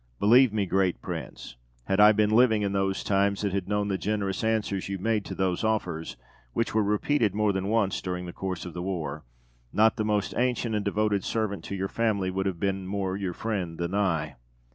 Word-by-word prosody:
Believe 120 +3 +6
me, 105 -2 0
great 95 -1 +1
prince, - - -7 0.3
had 95 +9 0
I 105 +1 +9
been 105 0 +2
living 110 -2 +4
in 100 - 0
those 95 -1 0
times, 100 0 +1
and 100 -2 0
had 95 -2 -2
known 105 0 0
the 95 -2 -1
generous 100 -2 -2
answers 110 -4 -1
you 100 - -2
made 110 +2 0
to - - -6
those 95 0 0
offers 90 - -2 0.4
(which 115 - -1
were 110 - +3
repeated 105 +1 +1
more 105 -1 +2
than 95 0 -2
once 105 -3 +1
during 90 -1 -4
the 85 - -7
course 95 -3 -4
of 90 - -7
the 90 - -5
war), 80 -6 -4 0.5
not 110 +3 +3
the 110 - 0
most 105 -1 0
ancient 120 -2 0
and 105 -1 0
devoted 100 -1 0
servant 110 -3 -2
to 100 - -4
your 95 0 -2
family 100 -4 0
would 95 +1 -1
have 90 -3 -3
been 95 -1 -1
more 95 -1 -2
your 95 -3 -3
friend 95 -6 -3
than 85 +1 -3
I. 90 -10 0
100 Hz, 210 wpm, -27 LUFS, 95-105 Hz, 0.5 s, I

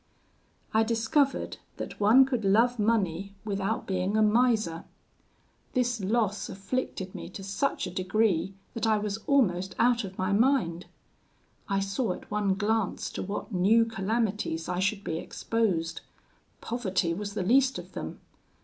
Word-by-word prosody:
"I 220 - +4
discovered 230 +5 +1 0.2
that - - -6
one 225 +6 +7
could 250 -4 -2
love 230 +5 +3
money 200 -3 0
without 200 +1 -2
being 190 +2 0
a 215 - +5
miser. 215 -6 +2 0.9
This 245 -2 +1
loss 205 0 0
afflicted 195 -2 -4
me - - -7
to 195 +1 -8
such 200 +8 -1
a 180 - -5
degree 190 -1 +1 0.2
that 230 0 -1
I 215 -1 +4
was 210 0 -3
almost 190 -10 +2
out 240 0 +3
of 190 -1 -8
my 185 +2 0
mind. 210 -7 +2 0.8
I 195 0 +1
saw 195 +1 -1
at - - -12
one 205 -2 +1
glance 215 0 -1
to - - -4
what 200 +3 -5
new 210 +6 +4
calamities 210 -5 -1
I 180 0 -2
should 195 +2 0
be 160 -3 -2
exposed: 185 -9 -1 0.6
poverty 190 -8 -1
was 205 +3 -5
the 195 - -1
least 265 +6 +3
of - - -9
them. - - -6
205 Hz, 150 wpm, -28 LUFS, 190-230 Hz, 0.9 s, one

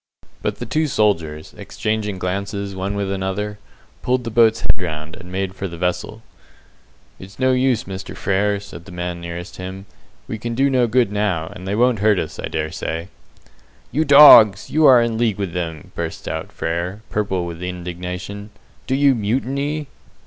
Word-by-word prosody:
But - - -1
the - - -6
two 155 0 0
soldiers, 85 - 0
exchanging 110 -2 -3
glances 100 +2 -3
one 95 +2 -3
with 100 -1 -2
the 95 -1 -2
other, 105 +2 -3 0.4
pulled 125 0 0
the 115 - -5
boat's 115 0 +4
head - - +3
round, 80 -3 -5
and 90 -2 -11
made 95 0 -2
for 95 0 -4
the 85 -2 -8
vessel. 90 +1 -2 1.0
"It's 95 +1 -12
no 130 0 +3
use, 125 -2 +2
Mr. 95 0 -7
Frere," 100 +1 +1
said 85 -4 -11
the 95 - -11
man 90 0 -4
nearest 85 +1 -7
him; 95 +1 -7 0.4
"we 110 - -5
can 120 +1 -4
do 135 +2 +2
no 125 -2 +3
good 115 -2 +2
now, 100 -6 -1
and 90 - -9
they 100 - -1
won't 120 -1 +3
hurt 105 0 +3
us, 80 - -4
I - - -3
dare 80 0 -3
say." 85 +3 -4 0.8
"You 150 +6 +2
dogs, 140 -8 +8
you 155 0 +5
are 125 -3 +7
in 115 -1 -2
league 115 -4 +1
with 100 -4 -3
them," 80 -4 -5
bursts - - -5
out - - -4
Frere, 90 +5 -3
purple 95 -4 -1
with 85 0 -7
indignation. 90 +3 -6 0.4
"Do 130 - +1
you 140 0 +5
mutiny?" 135 +7 -1
100 Hz, 180 wpm, -20 LUFS, 90-115 Hz, 1.0 s, dogs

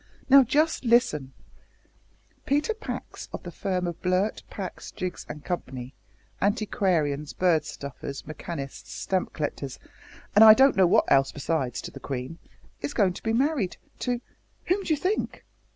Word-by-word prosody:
Now, 275 0 +10
just 300 +6 +2
listen: 230 - +2 1.1
Peter 295 +10 +2
Pax 440 - -7
of - - -6
the 175 - -7
firm 180 +1 -2
of 175 -1 -5
Blurt, 185 +3 +1
Pax, 190 -3 -6
Jiggs, 185 -1 -5
and 150 -1 -8
Company, 130 -7 -4 0.5
Antiquarians, 180 -8 0
Bird 165 -5 +2
Stuffers, 140 -1 -7
Mechanists, 155 -2 -7
Stamp 185 -1 -1
Collectors, 145 -3 -4 0.6
and 210 - +8
I 215 -1 +11
don't 270 +2 +5
know 190 -2 +5
what - - +4
else 135 0 +4
besides, 140 -5 -2
to - - -6
the - - -10
Queen 135 +4 -5 0.4
is 145 - -4
going 190 -3 +3
to - - -9
be 225 - -1
married 255 - +1 0.2
to 245 -1 -1 0.4
whom 380 +3 +1
do 370 - -3
you 310 - +3
think?" 375 +8 -2
180 Hz, 150 wpm, -26 LUFS, 145-235 Hz, 1.1 s, I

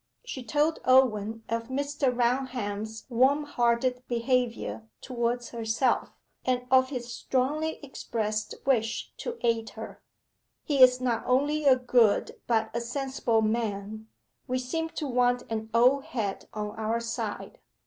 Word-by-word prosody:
She 270 - -6
told 300 +5 +1
Owen 225 -4 +3
of 230 0 -2
Mr. 280 0 0
Raunham's 235 -4 -2
warm 265 +4 +3
hearted 245 -2 +1
behaviour 240 -2 -1
towards 240 -1 -2
herself, 230 +2 0 0.3
and 250 -1 0
of 260 0 +5
his 245 -3 -5
strongly 295 +7 -1
expressed 215 -5 -3
wish 225 -5 0
to 480 -1 -5
aid 230 -2 +1
her. - - -8 0.6
'He 280 -3 +1
is 255 0 +7
not 240 -3 0
only 290 +4 +2
a 270 -2 +7
good, 245 -4 +2
but 220 -2 +1
a 235 - -1
sensible 245 -2 0
man. 215 -1 -2 0.4
We 255 - 0
seem 325 +6 -2
to 305 - -4
want 245 -1 +2
an 220 0 -3
old 250 +4 +4
head 210 -6 -4
on 210 -1 -4
our 220 +1 0
side. 235 0 -5
245 Hz, 135 wpm, -28 LUFS, 225-260 Hz, 0.6 s, is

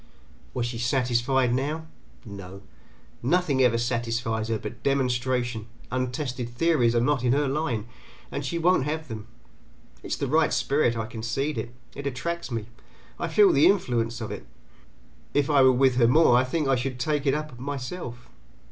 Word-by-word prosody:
Was 125 -2 0
she 120 -1 -4
satisfied 125 0 +1
now? 150 +5 -2 0.4
No. 100 -2 -9 0.6
Nothing 145 0 +2
ever 120 -2 +4
satisfies 115 -2 -1
her 115 -1 0
but 110 +3 -8
demonstration; 125 -4 0 0.2
untested 125 -1 -2
theories 120 -2 +2
are - - +4
not 130 +1 +1
in 125 0 +3
her 145 +1 +2
line, 135 -6 -1 0.5
and 140 - -3
she 135 +5 -2
won't 170 -4 +3
have 155 0 -3
them. 110 -1 -7 0.7
It - - -9
is - - -2
the - - -1
right 155 +4 +3
spirit, 135 -5 +1
I 110 - -2
concede 115 +7 -3
it; 120 +1 -6 0.2
it 140 0 -5
attracts 170 +7 -3
me; 115 -4 -3 0.5
I - - -1
feel 400 -4 +5
the - - +6
influence 120 - +1
of 110 - -4
it; - - -7 0.9
if 145 +1 +2
I 140 -2 +5
were 130 0 +7
with 130 0 +3
her 120 -2 +5
more 130 0 +5
I 125 +1 +4
think 150 +3 -1
I 135 - +4
should 125 0 -3
take 145 +2 0
it 135 - +3
up 150 -5 -5
myself. 125 -2 -6
125 Hz, 175 wpm, -26 LUFS, 120-145 Hz, 0.9 s, were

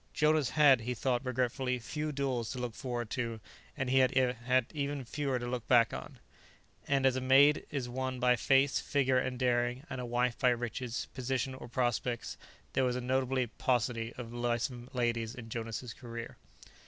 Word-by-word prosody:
Jonas 150 -3 +3
had, 140 -5 +5
he 125 +2 -3
thought 125 +2 0
regretfully, 125 0 -1
few 150 +5 -4
duels 135 -5 -1
to 130 - -5
look 125 -2 -3
forward 120 -2 -4
to, 115 -3 -2 0.4
and 130 - -1
he 130 +1 +4
had 125 -1 +2
even 140 -2 -3
fewer 135 +2 -1
to 120 - -4
look 120 -2 -4
back 120 -3 +5
on. 65 - -7 0.7
And, 135 -1 +2
as 130 -1 +4
a 130 - -1
maid 135 +3 +5
is 140 -4 -3
won 130 +1 -3
by 125 0 +4
face, 135 +4 +3
figure 130 -2 +2
and 125 0 -2
daring, 125 +1 0
and 130 - -3
a - - -4
wife 120 0 0
by 130 - +4
riches, 120 0 -2
position 130 0 -2
or 130 - -9
prospects, 120 -1 -1 0.4
there 135 - +2
was 125 -1 +1
a - - -1
notable 130 0 +1
paucity 120 -2 0
of 120 -2 -7
lissome 120 +1 -2
ladies 120 -2 -1
in 115 -2 -9
Jonas' 115 +1 -5
career. 115 -1 -8
125 Hz, 180 wpm, -32 LUFS, 120-130 Hz, 0.7 s, had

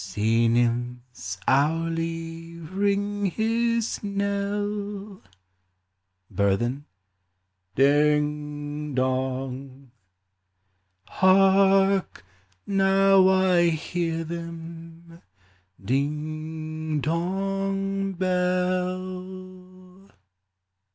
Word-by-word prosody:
Sea 110 +4 +1
nymphs 120 -4 -1
hourly 165 +3 -1
ring 200 +4 -1
his 230 +3 0
knell: 200 0 -3 1.1
Burthen. 120 +9 0 0.5
— 90 0 -49
Ding 150 +1 +1
dong! 130 0 -3 1.2
Hark! 195 - +3 0.4
now 195 -1 +4
I 185 -2 +4
hear 165 +1 -2
them 165 0 -9 0.6
— - - -18
ding, 155 +4 -3
dong, 195 +4 -1
bell 185 +1 -3
170 Hz, 55 wpm, -25 LUFS, 145-195 Hz, 1.2 s, now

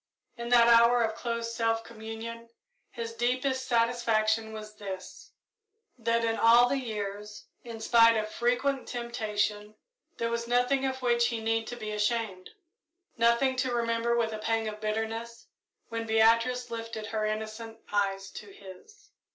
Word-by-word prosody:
In 235 -1 -6
that 240 -1 +6
hour 235 +1 +6
of 220 -1 -1
close 230 0 -3
self 225 -1 0
communion, 230 +1 -8 0.4
his 230 -1 -6
deepest 255 +3 -1
satisfaction 225 -2 +1
was 215 -1 -8
this 190 -2 -8 0.7
that 230 -1 0
in 225 0 -1
all 235 +2 +6
the 275 +2 0
years, 210 -3 -6 0.2
in 230 -2 -8
spite 230 0 +5
of 215 0 -1
frequent 250 +4 0
temptation, 215 -3 -2 0.4
there 230 0 -1
was 235 0 -2
nothing 250 +3 +2
of 260 -1 -3
which 235 -1 +3
he 230 -2 -3
need 225 0 -1
to 245 - -5
be 215 -3 -6
ashamed 210 -3 -2 0.7
nothing 235 +3 +3
to 255 0 0
remember 235 0 0
with 225 -2 0
a 215 - -5
pang 225 0 -1
of 215 0 -6
bitterness, 225 +2 -3 0.4
when 230 0 -4
Beatrice 230 +3 +3
lifted 225 -1 -5
her 220 0 -3
innocent 220 +1 -5 0.2
eyes 195 -1 0
to 205 -1 -10
his. 415 - -15
230 Hz, 150 wpm, -29 LUFS, 220-235 Hz, 0.7 s, that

